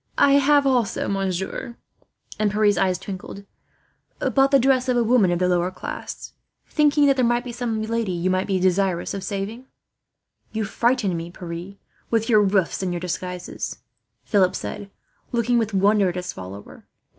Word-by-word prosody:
"I 280 Hz, -, +5 dB
have 285 Hz, 0 st, +4 dB
also, 250 Hz, -6 st, +1 dB
monsieur," 195 Hz, +5 st, -3 dB, 0.6 s
and 215 Hz, -1 st, +2 dB
Pierre's 210 Hz, 0 st, +3 dB
eyes 185 Hz, 0 st, +1 dB
twinkled, 195 Hz, +2 st, -8 dB, 0.9 s
"bought 270 Hz, 0 st, +4 dB
the 275 Hz, -, +5 dB
dress 260 Hz, 0 st, +2 dB
of 250 Hz, -, +2 dB
a 240 Hz, -, +3 dB
woman 230 Hz, -4 st, +4 dB
of 175 Hz, -, +1 dB
the 180 Hz, +1 st, +1 dB
lower 180 Hz, 0 st, +1 dB
class, -, -, -7 dB, 0.3 s
thinking 295 Hz, -1 st, +3 dB
that 275 Hz, -1 st, +4 dB
there 255 Hz, -, +2 dB
might 240 Hz, 0 st, +2 dB
be 250 Hz, -, -6 dB
some 230 Hz, -2 st, -2 dB
lady 225 Hz, -2 st, -1 dB
you 180 Hz, +1 st, 0 dB
might 185 Hz, +1 st, 0 dB
be 190 Hz, -2 st, +1 dB
desirous 185 Hz, -1 st, +1 dB
of 195 Hz, -, -5 dB
saving." 210 Hz, +6 st, -5 dB, 0.9 s
"You 220 Hz, 0 st, -1 dB
frighten 230 Hz, -2 st, +1 dB
me, 165 Hz, +1 st, -5 dB
Pierre, 175 Hz, +2 st, -8 dB, 0.3 s
with 225 Hz, 0 st, 0 dB
your 215 Hz, -3 st, +6 dB
roofs 195 Hz, -3 st, +1 dB
and 185 Hz, -2 st, -1 dB
your 175 Hz, -, -2 dB
disguises," 180 Hz, 0 st, -5 dB, 0.5 s
Philip 185 Hz, -3 st, +2 dB
said, 205 Hz, -1 st, -6 dB, 0.4 s
looking 240 Hz, 0 st, +2 dB
with 225 Hz, -1 st, -1 dB
wonder 200 Hz, 0 st, +3 dB
at 175 Hz, -, -5 dB
his 180 Hz, 0 st, -4 dB
follower. 95 Hz, +2 st, -10 dB
200 Hz, 170 wpm, -23 LUFS, 185-240 Hz, 0.9 s, your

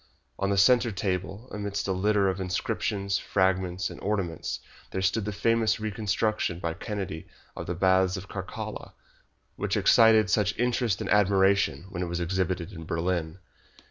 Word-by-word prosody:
On 100 Hz, -, 0 dB
the 100 Hz, -, +1 dB
centre 120 Hz, +4 st, +5 dB
table, 95 Hz, +3 st, -3 dB
amidst 100 Hz, -1 st, -3 dB
a -, -, 0 dB
litter 100 Hz, +1 st, +2 dB
of 95 Hz, 0 st, -1 dB
inscriptions, 100 Hz, +1 st, -1 dB
fragments, 95 Hz, -2 st, 0 dB
and -, -, -10 dB
ornaments, 95 Hz, -5 st, -2 dB, 0.3 s
there 95 Hz, -, -3 dB
stood 100 Hz, +3 st, +1 dB
the 105 Hz, -, -2 dB
famous 115 Hz, +2 st, +1 dB
reconstruction 105 Hz, -3 st, -1 dB
by 85 Hz, -1 st, -3 dB
Kennedy 95 Hz, -3 st, -5 dB, 0.3 s
of -, -, -6 dB
the 90 Hz, -, -2 dB
Baths 95 Hz, +1 st, +3 dB
of 95 Hz, +1 st, -8 dB
Caracalla, 95 Hz, -2 st, -6 dB, 0.6 s
which -, -, -1 dB
excited 110 Hz, -2 st, +6 dB
such 100 Hz, +2 st, +1 dB
interest 120 Hz, -4 st, 0 dB
and -, -, -4 dB
admiration 100 Hz, -2 st, +3 dB
when 90 Hz, -2 st, -4 dB
it 90 Hz, -, -1 dB
was 85 Hz, +1 st, -3 dB
exhibited 90 Hz, +1 st, -1 dB
in 80 Hz, -5 st, -8 dB
Berlin. 85 Hz, 0 st, -2 dB
95 Hz, 155 wpm, -27 LUFS, 90-105 Hz, 0.6 s, excited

